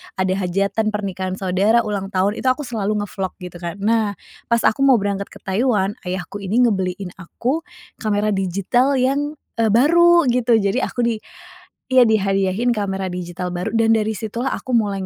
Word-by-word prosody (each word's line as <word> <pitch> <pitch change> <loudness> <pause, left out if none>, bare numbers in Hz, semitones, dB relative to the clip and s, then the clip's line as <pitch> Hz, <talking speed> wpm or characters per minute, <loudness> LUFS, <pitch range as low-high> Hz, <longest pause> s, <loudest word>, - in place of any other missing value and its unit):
ada 185 0 0
hajatan 195 +4 0
pernikahan 190 -3 -3
saudara, 195 +5 +2
ulang 205 -3 -3
tahun, 195 +1 0
itu - - -2
aku 255 +4 +1
selalu 210 -4 -2
nge-vlog, 195 -2 -5
gitu 175 -1 -8
kan. 170 -1 -5
Nah 210 0 0 0.3
pas 235 -1 +2
aku 220 - +2
mau 265 - +7
berangkat 200 -2 -1
ke - - -15
Taiwan, 205 -1 0
ayahku 180 +2 -4
ini 205 +5 +1
ngebeliin 190 -4 -1
aku, 245 - -2 0.4
kamera 210 -1 0
digital 195 +7 +1
yang, 285 +3 0 0.2
eee, 230 - +2
baru 340 +4 +5
gitu. 240 -1 +2
Jadi 200 +4 0
aku 255 -1 -1
di 235 -2 +1 0.8
iya, 255 - +7
dihadiahin 195 +2 +1
kamera 195 -3 -2
digital 180 0 -5
baru 180 +4 -2
dan 225 0 +4
dari 220 -1 0
situlah 230 +5 -3
aku 255 - -6
mulai 200 -4 +1
205 Hz, 165 wpm, -20 LUFS, 190-235 Hz, 0.8 s, mau